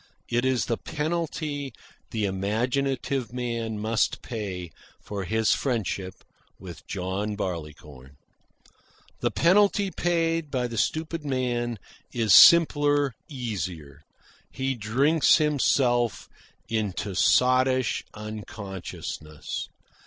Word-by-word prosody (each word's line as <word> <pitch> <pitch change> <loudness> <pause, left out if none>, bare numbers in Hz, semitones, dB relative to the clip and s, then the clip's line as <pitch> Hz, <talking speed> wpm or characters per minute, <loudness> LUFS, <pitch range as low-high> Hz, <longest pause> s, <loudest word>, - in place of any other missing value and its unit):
It 120 +1 +1
is 130 -3 +1
the 115 - -2
penalty 150 -3 -3 0.4
the 110 -2 -1
imaginative 120 +6 -1
man 115 -3 -3
must 110 +2 0
pay 95 -7 -5 0.3
for 100 -2 -5
his 110 +1 +1
friendship 100 -7 -3 0.3
with 90 -2 -11
John 100 +3 -3
Barleycorn. 75 -7 -7 1.0
The - - +1
penalty 200 +2 +3
paid 165 -3 0
by 130 -3 -1
the 115 - -7
stupid 160 +4 -1
man 120 -4 -1 0.3
is 115 -4 +2
simpler, 145 -4 +7 0.2
easier. 90 - -5 0.5
He 135 0 -2
drinks 130 +8 +3
himself 130 -5 +1 0.4
into 105 -2 -2
sottish 130 +4 +3
unconsciousness. 100 -7 -6
120 Hz, 95 wpm, -26 LUFS, 100-140 Hz, 1.0 s, simpler